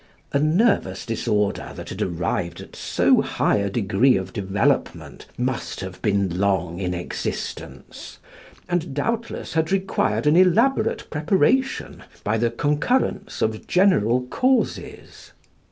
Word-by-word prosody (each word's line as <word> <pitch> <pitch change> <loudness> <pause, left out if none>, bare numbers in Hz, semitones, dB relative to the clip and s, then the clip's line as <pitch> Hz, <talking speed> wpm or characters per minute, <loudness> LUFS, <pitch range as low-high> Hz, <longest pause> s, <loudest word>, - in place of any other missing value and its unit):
A 140 - +3
nervous 155 - +1
disorder 105 -2 -1
that - - -8
had - - -6
arrived 85 0 -2
at - - -11
so - - +2
high - - +1
a 100 0 -1
degree 115 +5 +2
of - - -5
development 100 -2 -1
must 125 -4 -3
have 95 -1 -8
been 100 -4 0
long 95 -3 0
in 90 -2 -2
existence, 85 - -6 0.5
and 175 -5 -2
doubtless 230 +10 -3
had 160 +1 0
required 190 - 0
an 150 +2 +4
elaborate 220 +7 +3
preparation 195 - +1 0.2
by 110 +2 0
the 120 +1 +2
concurrence 150 - 0
of 110 0 -2
general 125 - +3
causes. 255 - -2
125 Hz, 120 wpm, -23 LUFS, -, 0.5 s, an